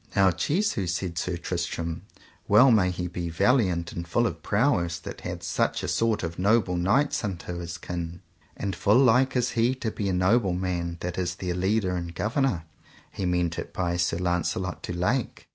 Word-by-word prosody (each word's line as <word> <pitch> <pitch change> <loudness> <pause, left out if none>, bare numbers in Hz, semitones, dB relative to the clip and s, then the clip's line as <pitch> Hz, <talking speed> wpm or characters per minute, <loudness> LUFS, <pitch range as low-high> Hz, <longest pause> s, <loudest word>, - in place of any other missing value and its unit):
Now 95 -2 +5
Jesu, 130 - 0
said 90 0 -2
Sir 90 -1 -2
Tristram, 85 -1 -3 0.5
well 125 +6 +7
may 100 -5 +4
he 90 0 -3
be 85 -1 -4
valiant 90 -2 +2
and 85 0 -6
full 120 +8 +2
of - - -3
prowess 100 -7 +1
that 85 - -8
hath - - -6
such - - 0
a - - -2
sort 115 -3 +1
of 85 0 -4
noble 100 -1 +3
knights 140 +12 +2
unto 90 -3 -4
his 85 -1 -5
kin, 85 -1 -5 0.4
and 100 -2 -3
full 105 +5 +3
like 130 +1 +4
is 125 -1 +1
he 115 +3 +2
to 115 -4 -3
be 100 -2 -2
a - - 0
noble 95 +2 +3
man 90 -2 -2
that 90 +1 -3
is 90 -1 -1
their 90 -1 -3
leader 95 +1 +1
and 85 -1 -5
governor. 110 - 0 0.5
He 95 - -3
meant 90 -1 0
it - - -7
by 85 -2 -1
Sir 85 -1 +1
Launcelot 90 +1 -1
du - - -5
Lake. 105 +8 -1
90 Hz, 190 wpm, -26 LUFS, 85-110 Hz, 0.5 s, well